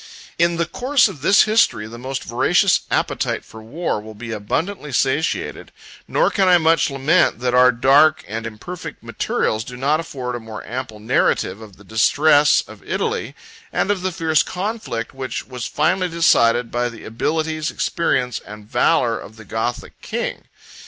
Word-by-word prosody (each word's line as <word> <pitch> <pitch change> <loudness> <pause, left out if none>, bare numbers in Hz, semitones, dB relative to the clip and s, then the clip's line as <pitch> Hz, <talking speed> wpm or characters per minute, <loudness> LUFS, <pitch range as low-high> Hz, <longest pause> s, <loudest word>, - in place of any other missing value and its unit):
In 170 0 +3
the 170 - +1
course 250 - +2
of 145 - -9
this 195 +7 +6
History, 215 - +2
the 115 +2 -10
most 130 +2 -4
voracious 175 - +3
appetite - - -1
for 110 - -12
war 115 0 -3
will 110 0 -11
be 115 +2 -7
abundantly 150 - -3
satiated; 135 +5 -1 0.4
nor - - +2
can 195 -2 +2
I 180 -1 +7
much 165 -1 +3
lament 140 +2 +2
that 125 -1 0
our 125 0 +6
dark 140 +5 +4
and 115 +2 -4
imperfect 140 +11 -8
materials 110 0 -1
do 125 +2 -9
not 145 +4 +1
afford 130 -6 -5
a 120 - -4
more 110 -1 -9
ample 120 -3 -6
narrative 105 -1 0
of 105 -4 -13
the 105 - -16
distress 145 +8 +4
of - - -13
Italy, - - -2 0.4
and 205 - 0
of 200 -3 -1
the 185 0 -1
fierce 160 -2 +2
conflict, 185 - -4
which 130 -1 -5
was 125 -2 -6
finally 180 +4 +1
decided 120 -8 +3
by 120 0 0
the 115 -2 -11
abilities, 155 +6 -2
experience, 125 -7 -1
and 105 0 -12
valor - - +2
of 110 - -11
the 110 -1 -13
Gothic 110 +4 -4
king. - - -4
135 Hz, 165 wpm, -20 LUFS, 115-165 Hz, 0.4 s, I